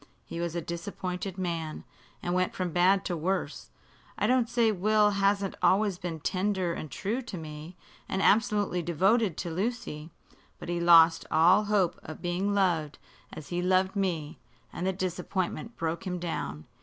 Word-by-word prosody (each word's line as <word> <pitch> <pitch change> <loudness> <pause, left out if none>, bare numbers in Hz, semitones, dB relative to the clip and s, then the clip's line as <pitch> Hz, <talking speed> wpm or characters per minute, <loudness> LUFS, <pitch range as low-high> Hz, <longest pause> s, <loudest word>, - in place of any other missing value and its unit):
He 170 - -6
was 170 -1 -3
a 170 - -1
disappointed 180 +2 -5
man, 165 -4 -3 0.4
and 175 - -1
went 185 0 0
from 180 -2 -2
bad 185 +3 +3
to 175 - -1
worse. 180 +4 -2 0.5
I - - +1
don't 250 -2 +2
say 235 -2 +3
Will 210 +2 +3
hasn't 200 0 +1
always 195 -1 +3
been 170 -3 -5
tender 185 -1 0
and 155 - -6
true 215 - -2
to 235 -7 -7
me, 155 +2 -9 0.3
and 190 - -1
absolutely 205 -3 +2
devoted 185 +3 +2
to 170 - -4
Lucy. 180 -5 -3 0.5
But - - -9
he 175 0 -1
lost 165 -1 +6
all 180 +6 +5
hope 205 -4 +1
of 155 - -9
being 185 +4 -1
loved 170 -7 +1 0.3
as 155 - -9
he 175 0 -1
loved 185 +2 +2
me, 170 -6 -2 0.3
and 180 - -3
the - - +2
disappointment 185 +4 -3
broke 165 +2 -3
him 180 -1 -2
down. 80 - -4
180 Hz, 165 wpm, -28 LUFS, 170-200 Hz, 0.5 s, lost